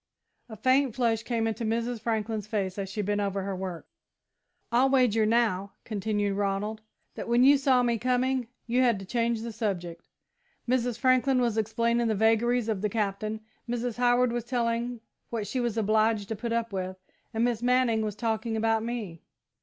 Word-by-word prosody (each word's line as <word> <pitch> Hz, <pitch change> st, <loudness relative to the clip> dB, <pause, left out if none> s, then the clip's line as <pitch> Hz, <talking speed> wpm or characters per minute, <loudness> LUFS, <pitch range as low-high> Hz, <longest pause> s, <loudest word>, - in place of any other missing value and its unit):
A 220 Hz, -, -7 dB
faint 260 Hz, +2 st, +2 dB
flush 230 Hz, -3 st, +1 dB
came 230 Hz, -1 st, -1 dB
into 225 Hz, +1 st, -2 dB
Mrs. 230 Hz, +1 st, -1 dB
Franklin's 220 Hz, -2 st, -2 dB
face 200 Hz, -3 st, -2 dB
as 195 Hz, -1 st, -3 dB
she 210 Hz, +1 st, -3 dB
bent 205 Hz, +1 st, 0 dB
over 195 Hz, -1 st, -1 dB
her 195 Hz, 0 st, -3 dB
work. 185 Hz, -3 st, -5 dB, 0.9 s
"I'll 250 Hz, +3 st, +4 dB
wager, 240 Hz, -5 st, +3 dB
now," 210 Hz, -4 st, +1 dB
continued 205 Hz, -1 st, -1 dB
Ronald, 205 Hz, +2 st, -1 dB, 0.3 s
"that -, -, -6 dB
when 240 Hz, +1 st, +4 dB
you 280 Hz, +2 st, +7 dB
saw 265 Hz, -2 st, +3 dB
me 235 Hz, -2 st, +1 dB
coming, 255 Hz, 0 st, +1 dB, 0.2 s
you 245 Hz, +1 st, +2 dB
had 240 Hz, -4 st, +3 dB
to 195 Hz, -, -8 dB
change 230 Hz, +2 st, 0 dB
the 230 Hz, +1 st, -5 dB
subject. 180 Hz, -6 st, -4 dB, 0.6 s
Mrs. 245 Hz, -2 st, +1 dB
Franklin 255 Hz, +1 st, +3 dB
was 240 Hz, -3 st, +1 dB
explaining 230 Hz, +2 st, +1 dB
the 220 Hz, -, +1 dB
vagaries 225 Hz, +2 st, +2 dB
of 215 Hz, -4 st, -1 dB
the 210 Hz, -, 0 dB
Captain, 215 Hz, +1 st, -2 dB, 0.3 s
Mrs. 240 Hz, -1 st, -2 dB
Howard 245 Hz, 0 st, +3 dB
was 240 Hz, -1 st, -3 dB
telling 235 Hz, -1 st, -1 dB, 0.3 s
what 225 Hz, -3 st, -3 dB
she 255 Hz, -, -2 dB
was 240 Hz, -2 st, -1 dB
obliged 215 Hz, -1 st, +2 dB
to 220 Hz, -, -2 dB
put 230 Hz, +3 st, -4 dB
up 230 Hz, -2 st, -1 dB
with, 185 Hz, 0 st, -3 dB, 0.3 s
and 225 Hz, 0 st, 0 dB
Miss 240 Hz, -2 st, 0 dB
Manning 245 Hz, -2 st, +2 dB
was 210 Hz, -2 st, -2 dB
talking 225 Hz, 0 st, -1 dB
about 225 Hz, 0 st, +2 dB
me." 220 Hz, -8 st, -5 dB
225 Hz, 180 wpm, -28 LUFS, 210-240 Hz, 0.9 s, you